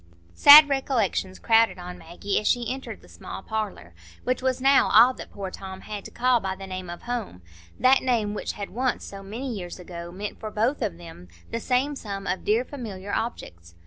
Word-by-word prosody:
Sad 290 - +10
recollections 255 -9 -1
crowded 225 -2 +3
on 180 0 -8
Maggie 175 +4 -2
as 215 - -3
she 245 0 +1
entered 265 0 -8
the - - -16
small - - -9
parlour, 205 - -5 0.3
which 255 +1 -1
was 260 0 0
now 270 +1 +4
all 240 +4 +7
that - - -10
poor 195 -2 -6
Tom 190 0 -8
had 210 -2 -7
to - - -7
call 250 0 +2
by 190 -3 -3
the 195 0 -9
name 185 -1 -6
of 175 - -8
"home,"—that 90 - -1
name 230 -5 0
which 210 - -4
had 200 -1 -7
once, 255 +3 -1
so 195 0 -9
many 230 +6 -5
years 180 -4 -6
ago, 170 -1 -8
meant 200 +3 -6
for 215 - -5
both 230 +7 0
of 200 -7 -2
them 165 - -12 0.2
the 230 - -2
same 260 +5 0
sum 200 -6 -6
of 185 +1 -2
dear 225 +4 +1
familiar 205 -8 -7
objects. 85 - -5
210 Hz, 200 wpm, -25 LUFS, 185-250 Hz, 0.3 s, Sad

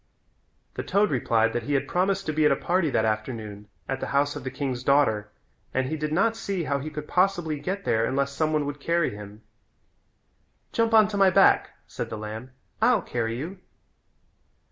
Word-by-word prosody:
The - - -4
toad 205 +1 +1
replied 115 -3 +2
that 120 - -1
he 145 +5 -1
had 135 - 0
promised 195 +2 0
to 155 - -2
be 155 +1 +1
at 150 - +5
a - - +4
party 175 -2 0
that 110 -5 +1
afternoon 110 -2 -3 0.2
at 135 0 -2
the - - -4
house 145 +1 +1
of 145 - -6
the 130 - -3
king's 130 -3 -3
daughter 120 -7 +2 0.5
and 130 0 +1
he 160 - -2
did 150 0 -3
not 220 +8 +2
see 195 -5 -3
how 140 -2 -1
he 150 +3 -5
could 150 -1 -7
possibly 175 -5 +1
get 195 +4 -4
there 110 0 +2
unless 140 +2 0
some 155 +2 0
one 150 -2 +1
would 145 0 -5
carry 170 +2 +1
him. 105 +1 -10 1.3
"Jump 230 -1 +2
on 215 -1 +7
my 195 -1 +6
back," 185 - +4 0.2
said - - -6
the 110 - -5
lamb. 110 +4 -7 0.3
"I'll 230 -2 +4
carry 115 -1 -2
you." 175 +8 -6
145 Hz, 195 wpm, -26 LUFS, 120-180 Hz, 1.3 s, on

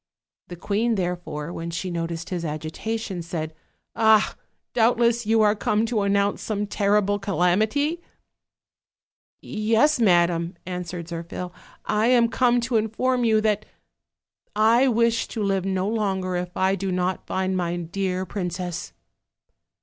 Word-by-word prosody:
The 175 - -7
queen, 215 +6 0
therefore, 175 -4 -3
when 165 0 -5
she 175 +2 -4
noticed 170 0 -4
his 175 -2 -2
agitation, 175 +6 -4
said: 160 -2 -4 0.4
"Ah! 220 -1 +4 0.4
doubtless 235 0 +2
you 220 0 +4
are 210 0 +4
come 215 +1 +1
to 225 -2 0
announce 200 0 +1
some 210 -1 -2
terrible 205 0 +1
calamity?" 215 - +1 1.4
"Yes, 225 +7 +2
madam," 175 -4 +3
answered 180 -2 -5
Zirphil, 170 +1 -6 0.3
"I 215 +2 +1
am 240 -2 +4
come 245 0 +3
to 235 0 +1
in 220 0 +1
form 250 +3 0
you 220 -2 +3
that 215 -1 +1 0.9
I 230 +5 +4
wish 230 -1 +2
to 220 - -4
live 195 -2 0
no 190 0 0
longer 195 -4 -1
if 180 0 -4
I 190 +1 +2
do 195 0 -2
not 180 +1 -1
find 190 0 -1
my 175 -1 -1
dear 185 +2 -2
princess." 180 -2 -4
195 Hz, 135 wpm, -24 LUFS, 180-220 Hz, 1.4 s, Ah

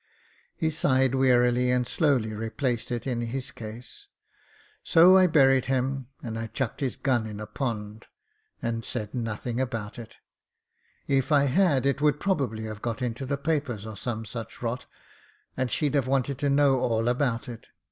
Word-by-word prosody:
He 160 -1 0
sighed 130 -4 +2
wearily 125 -1 +3
and 125 0 +2
slowly 130 -8 +1
replaced 115 +2 -2
it 120 -1 -3
in 125 -3 -1
his 125 +3 -4
case. 120 - -9 0.8
"So 175 +2 +7
I 185 -1 +6
buried 135 -5 +4
him» 130 0 -1 0.2
and 115 -1 -4
I 115 - -4
chucked 120 +1 -3
his 135 -3 -1
gun 120 -5 0
in 105 -1 -7
a 110 - -5
pond, 105 -2 -4 0.6
and 115 -1 -2
said 105 -4 -4
nothing 115 +1 -3
about 115 -4 -4
it 115 - -11 0.9
If 135 0 +1
I 145 -2 +5
had 140 -2 +3
it 140 +1 +1
would 150 -1 +3
probably 135 - -1
have 110 -1 -6
got 115 +1 -3
into 125 +2 -3
the 140 +1 -1
papers 140 -8 -2
or 110 -1 -7
some 115 +1 -4
such 115 +2 -7
rot, 120 +2 -3 0.7
and 130 -1 -1
she'd 150 +2 0
have 140 -3 +1
wanted 135 0 0
to 145 -1 +1
know 140 -1 +4
all 115 -1 0
about 125 0 0
it. 115 -2 -9
125 Hz, 170 wpm, -27 LUFS, 115-140 Hz, 0.9 s, So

